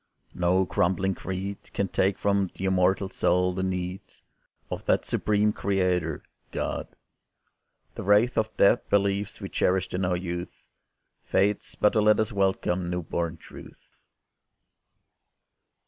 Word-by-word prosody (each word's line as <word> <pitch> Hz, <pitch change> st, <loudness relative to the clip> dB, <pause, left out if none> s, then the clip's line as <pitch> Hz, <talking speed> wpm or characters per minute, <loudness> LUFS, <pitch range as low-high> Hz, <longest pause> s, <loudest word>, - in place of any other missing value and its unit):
No 90 Hz, +2 st, +2 dB
crumbling 95 Hz, +2 st, +1 dB
creed 95 Hz, +2 st, -5 dB
Can 100 Hz, -, 0 dB
take 95 Hz, +1 st, +1 dB
from 100 Hz, -2 st, +1 dB
the 95 Hz, -, -4 dB
immortal 95 Hz, +1 st, +2 dB
soul 90 Hz, -1 st, +1 dB
the 95 Hz, -, -3 dB
need 90 Hz, 0 st, -2 dB, 0.7 s
Of -, -, -4 dB
that -, -, +2 dB
supreme 105 Hz, 0 st, +1 dB
Creator, 90 Hz, -5 st, 0 dB, 0.3 s
God. -, -, -3 dB, 1.1 s
The -, -, -6 dB
wraith 105 Hz, +5 st, +3 dB
Of 110 Hz, 0 st, -1 dB
dead 100 Hz, +5 st, +5 dB
beliefs 100 Hz, 0 st, 0 dB
we -, -, -5 dB
cherished 95 Hz, 0 st, 0 dB
in 90 Hz, +1 st, -1 dB
our 90 Hz, -1 st, +1 dB
youth 85 Hz, -1 st, -6 dB, 0.6 s
Fades 100 Hz, +2 st, 0 dB
but 105 Hz, -, +3 dB
to 110 Hz, -, +3 dB
let 105 Hz, 0 st, +4 dB
us 110 Hz, +1 st, 0 dB
welcome 95 Hz, -3 st, 0 dB
new 90 Hz, 0 st, -2 dB
born 85 Hz, 0 st, -3 dB
Truth. -, -, -14 dB
95 Hz, 130 wpm, -26 LUFS, 90-100 Hz, 1.1 s, dead